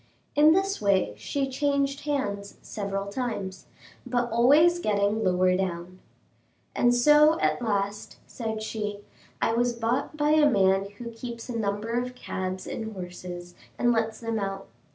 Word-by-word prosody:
In 300 +2 +7
this 390 +2 0
way 190 - +2
she 270 - -2
changed 280 +1 -1
hands 205 -9 -2
several 200 -2 -4
times, 200 -7 -4 0.4
but 245 -1 -1
always 295 +9 +5
getting 210 -3 +1
lower 185 0 +3
down. 185 -1 -3 0.8
"And 245 0 +3
so 300 +5 +5
at - - +1
last," 205 -2 -2
said 220 -2 -5
she, 210 -2 -4 0.4
"I 225 - +2
was 240 +1 +1
bought 240 +6 -2
by 295 0 +2
a 305 -1 +5
man 195 -3 +2
who 235 0 -7
keeps 235 +1 -8
a 245 - -4
number 210 0 -2
of 250 +1 -2
cabs 185 -5 -4
and 220 -1 -5
horses, 180 -1 -8 0.2
and 240 - +3
lets 225 -1 0
them 230 -1 -2
out. 195 -1 -4
225 Hz, 150 wpm, -27 LUFS, 195-250 Hz, 0.8 s, In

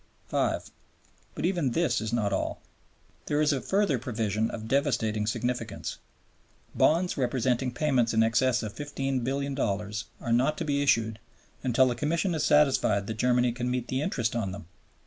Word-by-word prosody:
5. - - -1 0.6
But - - -2
even 170 -9 +1
this 170 -7 +1
is 110 0 -3
not 105 -4 0
all. - - -2 0.7
There 145 - +1
is 150 -1 +3
a 135 - -1
further 195 - +1
provision 110 -2 -1
of 110 -1 -6
devastating 110 -6 +1
significance. 125 +2 -3 0.7
Bonds 175 +3 +2
representing 125 -1 0
payments 125 -3 +1
in 110 0 +3
excess 115 +2 +2
of 105 -1 -5
$15,000,000,000 135 -6 -2
are 115 - -1
not 135 +6 +2
to 165 - -3
be 140 -1 +1
issued 115 -6 +2 0.4
until 130 +1 +3
the 125 - +1
Commission 165 +8 0
is 155 -2 -1
satisfied 135 -10 +3
that 110 +1 -5
Germany 125 0 +3
can 125 +1 -3
meet 125 -1 -2
the 130 +1 -1
interest 120 - -1
on 105 -5 -1
them. 95 -2 -8
125 Hz, 160 wpm, -28 LUFS, 115-140 Hz, 0.7 s, is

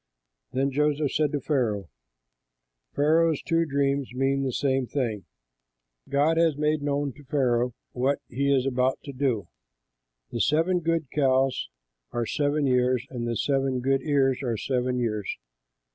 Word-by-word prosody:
Then 135 +2 0
Joseph 150 +1 +1
said 150 -2 +1
to 145 - 0
Pharaoh, 120 - -1 1.1
"Pharaoh's 160 +1 +3
two 165 -1 +1
dreams 140 -2 0
mean 135 +1 +1
the 135 -1 -1
same 135 0 0
thing; 115 -8 -2 0.8
God 150 +4 +2
has 165 -3 +3
made 150 0 +1
known 145 -1 -1
to 145 - -16
Pharaoh 125 -4 +1 0.2
what 135 +3 +1
he 140 +3 0
is 135 -2 +3
about 130 0 +1
to 140 - -7
do. 125 -6 -1 0.8
The 120 - -2
seven 165 +4 +2
good 165 -4 -1
cows 135 - +1 0.4
are 120 -1 -1
seven 145 +3 0
years, 125 -1 +2
and 120 -2 -3
the 115 -1 -1
seven 135 -2 0
good 135 +2 +1
ears 135 -2 +2
are 120 -4 -1
seven 125 +2 -1
years. 105 -4 -2
135 Hz, 145 wpm, -26 LUFS, 125-145 Hz, 1.1 s, Pharaoh's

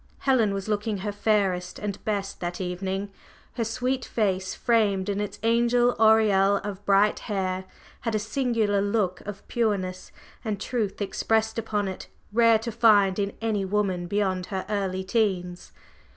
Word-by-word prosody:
Helen 245 -6 +3
was 195 0 -4
looking 210 0 -1
her 205 +2 -3
fairest 200 -4 0
and 205 -2 -5
best 200 -2 -2
that 175 0 -4
evening 190 +2 -3 0.4
her 235 - -1
sweet 250 +3 -1
face, 190 -5 -1
framed 205 -5 +1
in 200 0 -1
its 205 - -4
angel 240 +1 +3
aureole 215 -3 +5
of 205 -1 -6
bright 200 +1 +4
hair 190 -3 -2 0.3
had 230 -2 -2
a - - +3
singular 220 -2 0
look 200 -3 0
of 205 -1 -8
pureness 195 -6 -1 0.3
and 215 -4 -2
truth 215 -3 -2
expressed 220 +3 0
upon 210 -2 -1
it 190 - -6 0.3
rare 230 0 +5
to 230 +2 -5
find 210 -4 +4
in 200 0 -1
any 215 -3 0
woman 190 -3 -1
beyond 190 -2 -1
her 190 -2 -4
early 190 -3 -1
teens. 185 -4 -1
205 Hz, 150 wpm, -26 LUFS, 190-220 Hz, 0.4 s, aureole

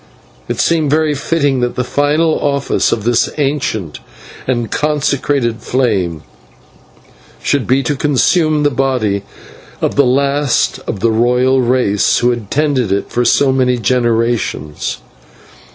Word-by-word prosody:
It - - -4
seemed 160 -3 +1
very 155 +1 +2
fitting 145 -2 0
that 120 0 -1
the 125 - -1
latest 150 +5 +1
office 140 -1 0
of 110 - -1
this 120 +1 +2
ancient 135 - -2 0.5
and 120 -4 -1
consecrated 140 -5 0
flame 100 - -1 1.2
should 140 -4 0
be 135 +2 +2
to 145 - -1
consume 150 +2 +2
the 145 - +2
body 125 -7 0 0.6
of - - -2
the 140 - +6
last 140 +1 +1
of 95 - -4
the 115 - +2
royal 125 +3 +2
race 120 -5 +1
who 120 0 +2
had 115 -5 -5
tended 140 -8 0
it 100 +1 -2
for 120 - 0
so 135 +3 +3
many 125 -1 +1
generations. 115 - -1
130 Hz, 135 wpm, -15 LUFS, 120-145 Hz, 1.2 s, the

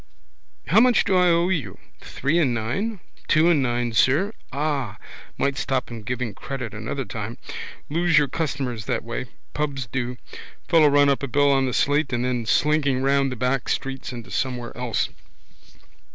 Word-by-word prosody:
How 170 - +5
much 245 -1 +5
do 190 - +1
I 180 0 +5
owe 170 +1 +3
you? 135 - -2 0.2
Three 155 +5 -1
and 130 -8 +2
nine? 170 - -2 0.3
Two 160 +2 +5
and 155 -4 +3
nine, 120 -2 0
sir. 150 - +3 0.2
Ah. 140 -6 -2 0.4
Might 140 -1 0
stop 130 -3 -1
him 115 -1 -6
giving 120 0 -3
credit 130 -1 -6
another 125 +6 -4
time. 105 +2 -6 0.5
Lose 170 +1 +2
your 150 -1 +5
customers 130 -8 -3
that 115 -1 -1
way. 120 +2 -4 0.3
Pubs 140 -4 -2
do. 125 +1 -3 0.5
Fellows 160 -3 +6
run 145 0 +5
up 140 - +1
a 140 - -2
bill 145 +2 +3
on 135 -1 +3
the - - -1
slate 145 +3 +2
and 120 0 0
then 125 -3 -1
slinking 145 +1 +2
around 140 0 +2
the 125 - -4
back 125 +2 -1
streets 135 -1 -3
into 120 -2 -8
somewhere 125 -2 -2
else. 120 -2 -1
135 Hz, 170 wpm, -24 LUFS, 120-150 Hz, 0.5 s, Fellows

